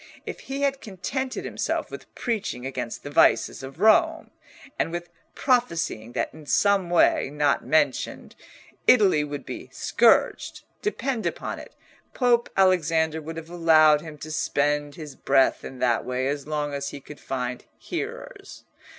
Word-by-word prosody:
If - - -6
he 275 +1 -5
had 275 -1 0
contented 255 +7 -4
himself - - -2
with - - -10
preaching 215 - -3
against 125 -3 -5
the 145 - -7
vices - - +3
of 135 +3 -10
Rome, 325 - +3 0.5
and - - 0
with 175 0 -5 0.3
prophesying 170 - 0
that - - -2
in 155 -1 -13
some 200 -1 +2
way, 175 -5 +3
not 145 -1 +1
mentioned, 155 - 0 0.5
Italy 190 -11 +5
would 145 -1 -6
be - - -7
scourged, - - +2 0.2
depend 270 - -2
upon - - -4
it - - -13 0.4
Pope 240 -2 +2
Alexander 165 -4 +2
would 160 +2 -7
have 165 +1 -8
allowed 155 -3 +5
him 155 -2 -10
to 155 +2 -8
spend 145 -1 0
his 150 -4 -9
breath 135 -1 +2
in 130 - -8
that 120 -2 +1
way 125 +1 -2
as 145 0 -3
long 150 -1 -2
as 140 0 -3
he 145 - -8
could 145 +2 -12
find 125 -2 -4
hearers. - - -7
155 Hz, 150 wpm, -25 LUFS, 140-200 Hz, 0.5 s, Italy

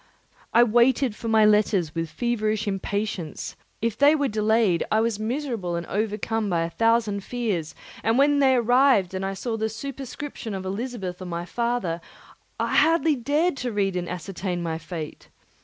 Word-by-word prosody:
I 235 - +6
waited 240 +1 +3
for 230 - -6
my 220 -1 +5
letters 210 -6 +3
with 165 -1 -3
feverish 215 -2 -1
impatience; 200 -3 -3 0.3
if 230 -2 0
they 285 +5 +5
were 285 -2 +1
delayed 215 -4 +2
I 215 - +4
was 225 -2 0
miserable 225 - -2
and 170 0 -3
overcome 215 +1 -1
by 170 -2 +1
a 165 - -4
thousand 225 -2 +1
fears; 205 -11 -3 0.3
and 225 +2 +2
when 285 +1 +4
they 265 -2 +5
arrived 245 -5 +4
and 190 0 -3
I 195 0 -2
saw 225 +3 -3
the 220 0 -1
superscription 270 -1 -6
of 190 -1 -5
Elizabeth 195 -3 -4
or - - -5
my 170 -1 -4
father, 235 -5 -1 0.6
I - - +1
hardly 325 -1 +4
dared 290 +7 +1
to 250 -2 -3
read 195 -3 0
and 175 -1 -3
ascertain 180 0 -4
my 165 -1 -2
fate. 165 -3 -7
215 Hz, 170 wpm, -25 LUFS, 190-245 Hz, 0.6 s, I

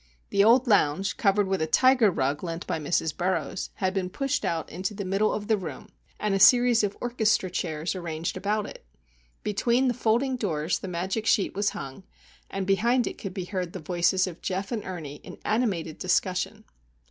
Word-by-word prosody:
The 200 - +4
old 240 +4 +5
lounge, 195 - +2
covered 200 -1 +2
with 190 -2 -1
a 160 - +1
tiger 255 +4 +5
rug 145 -3 -1
lent 170 0 -4
by 160 - -2
Mrs. 155 0 0
Burroughs, 185 +1 -2
had 185 0 -1
been 190 -2 -1
pushed 275 +7 -1
out 165 -2 -1
into 185 +5 -4
the 200 -1 -4
middle 195 +3 +1
of 210 -1 -3
the 220 0 +2
room, 160 -8 -7 0.3
and 210 -2 0
a 195 - +1
series 240 +1 +6
of 205 -1 -2
"orchestra 220 -6 +1
chairs" 160 -2 -2
arranged 170 -3 -4
about 205 +2 -1
it. - - -10 0.6
Between 235 +5 +1
the 245 - +2
folding 250 +3 +1
doors 165 -7 -1
the - - -7
magic 190 +5 -2
sheet 220 -3 +2
was 205 +1 +1
hung, 135 +5 -7 0.5
and 195 -1 -3
behind 235 +6 +2
it - - -5
could 195 -3 -6
be 185 - -3
heard 180 -2 -4
the 185 - -5
voices 175 +3 +1
of 180 -2 -8
Geof 190 +3 -3
and 225 -4 -2
Ernie 155 -6 -6
in - - -10
animated 200 -8 -1
discussion. 185 0 0
195 Hz, 195 wpm, -26 LUFS, 175-220 Hz, 0.6 s, series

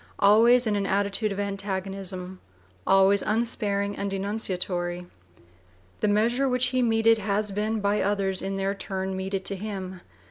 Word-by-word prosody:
vii) - - -26 0.2
always 235 +4 +5
in 215 -2 0
an 200 -1 -1
attitude 200 +2 +1
of 195 - -4
antagonism, 195 -2 -4 0.5
always 195 +1 +5
unsparing 205 -2 -1
and 200 0 -3
denunciatory. 185 -3 -2 0.9
The - - +1
measure 235 +6 +2
which 250 0 +2
he 255 - +2
meted 225 -1 +3
has 205 0 -1
been 210 +2 -1
by 205 +1 +1
others 195 -1 0
in 195 0 -3
their 195 0 -1
turn 190 -1 -4
meted 190 0 -3
to 200 - +1
him. 190 -2 -6
200 Hz, 150 wpm, -26 LUFS, 190-215 Hz, 0.9 s, always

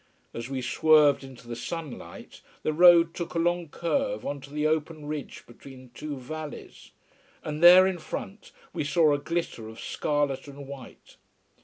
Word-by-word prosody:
As 115 +2 -6
we 130 -2 -4
swerved 150 +3 +4
into 130 -3 -13
the 120 - -5
sunlight, 160 +2 -8 0.2
the 155 - 0
road 170 0 +6
took 170 -1 -6
a - - 0
long 175 0 0
curve 260 - -2
on 140 -1 -4
to 140 - -12
the 150 +1 -2
open 155 0 -1
ridge 150 -2 -6
between 130 +1 -14
two 150 -2 -6
valleys. 155 +4 -9 0.5
And 150 0 -5
there 180 +2 +9
in 190 -2 -1
front 195 +5 -7 0.2
we - - -2
saw 150 +1 +3
a 145 - 0
glitter 165 -8 -4
of 110 - -12
scarlet 145 -2 -2
and 140 0 -10
white. 135 -3 -12
150 Hz, 165 wpm, -27 LUFS, 135-170 Hz, 0.5 s, there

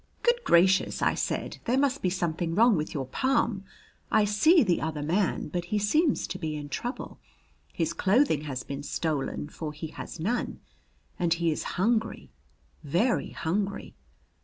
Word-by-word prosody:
"Good 480 0 +2
gracious," 185 +2 +3
I - - +3
said, - - -3
"there 250 +3 +2
must 280 0 +1
be 185 - +1
something 170 -2 -2
wrong 230 +2 +5
with 155 -2 -2
your 135 -3 -3
palm. 225 - 0 0.4
I 215 -1 +4
see 310 - +5
the 180 -5 +1
other 155 -2 -3
man, 180 +6 0
but 175 -1 -3
he 210 +4 -1
seems 285 - +2
to 185 - -6
be 155 -3 -3
in 145 -1 -6
trouble. 245 - -5 0.5
His 165 -1 -1
clothing 195 - +2
has 130 -3 -4
been 140 0 -6
stolen, 145 -1 -2
for 150 0 -6
he 155 +1 -6
has - - -8
none, 225 +10 -2 0.6
and 170 -1 +2
he 170 -1 +1
is 150 - -2 0.2
hungry, 220 +4 0 0.5
very 175 - +1
hungry." 200 +4 -3
180 Hz, 160 wpm, -28 LUFS, 160-225 Hz, 0.6 s, wrong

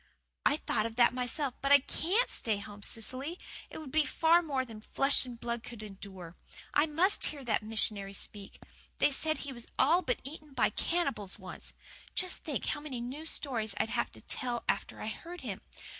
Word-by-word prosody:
"I 290 - +3
thought 215 -7 0
of 225 - -9
that 240 0 +6
myself 255 +2 0
but 275 +1 +1
I 285 - +12
CAN'T 360 - +2
stay 220 -4 0
home, 205 0 -9
Cecily. 260 - -2 0.3
It - - -8
would 305 -4 -7
be 310 0 +3 0.4
more 275 -5 0
than 225 -3 -9
flesh 275 +5 +3
and 240 -2 -7
blood 235 0 -2
could 230 -2 -8
endure. 190 -4 -9 0.4
I 295 +2 +5
MUST 345 +7 +3
hear 280 -3 -4
that 225 -2 +2
missionary 210 -2 0
speak. 200 0 -7 0.4
They - - +4
say 310 +3 +1
he 280 -3 -5
was 240 -2 -5
all 330 +7 +5
but 255 -8 0
eaten 300 +1 -9
by 250 - +3
cannibals 275 - -1
once. 185 -3 -6 0.4
Just 370 0 +2
think 295 -4 -2
how 295 - -1
many 290 -5 -5
new 265 +7 -5
stories 225 -10 +1
I'd - - +2
have - - 0
to - - -13
tell 245 -2 -2
after - - 0
I'd - - -4
heard 350 +1 -8
him! - - -4
255 Hz, 190 wpm, -32 LUFS, 220-300 Hz, 0.4 s, I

